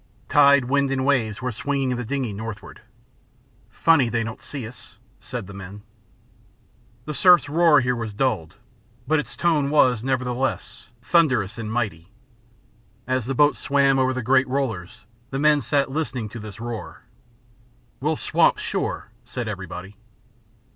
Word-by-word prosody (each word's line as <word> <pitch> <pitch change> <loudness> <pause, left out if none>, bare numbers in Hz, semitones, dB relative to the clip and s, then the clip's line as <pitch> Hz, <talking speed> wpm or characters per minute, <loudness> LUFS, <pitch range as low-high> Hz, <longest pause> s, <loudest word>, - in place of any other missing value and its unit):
Tide, 140 -2 +5
wind, 140 +2 +1
and 135 -1 -1
waves 125 -5 0
were 125 - -1
swinging 135 +2 -1
the 125 - -4
dingey 125 -2 -3
northward. 110 +1 -8 0.9
"Funny 160 -7 +3
they 115 -1 0
don't 115 0 -7
see 135 -6 -7
us," 115 -2 -14 0.2
said 125 -5 -6
the 100 - -11
men. 100 +1 -10 1.2
The 150 - -4
surf's 175 +3 +5
roar 165 +1 +4
was 140 - +5
here 115 -4 -2
dulled, 110 -12 -1 0.5
but 155 0 +3
its 135 - -6
tone 155 -5 +1
was, 130 -6 +3
nevertheless, 130 -3 -2
thunderous 125 - +2
and 110 -1 -4
mighty. 100 -7 -3 1.0
As 130 -2 -1
the 135 - -2
boat 145 +2 +4
swam 140 -1 +2
over 130 0 +2
the 130 -1 -3
great 130 +2 +3
rollers, 115 -10 -3 0.2
the 135 - -4
men 150 0 +3
sat 135 +2 0
listening 130 -7 -3
to 115 - -8
this 105 0 -9
roar. 115 -1 -7 1.0
"We'll - - 0
swamp - - +2
sure," - - -3
said 120 0 -5
everybody. 95 -1 -7
125 Hz, 145 wpm, -23 LUFS, 110-140 Hz, 1.2 s, Tide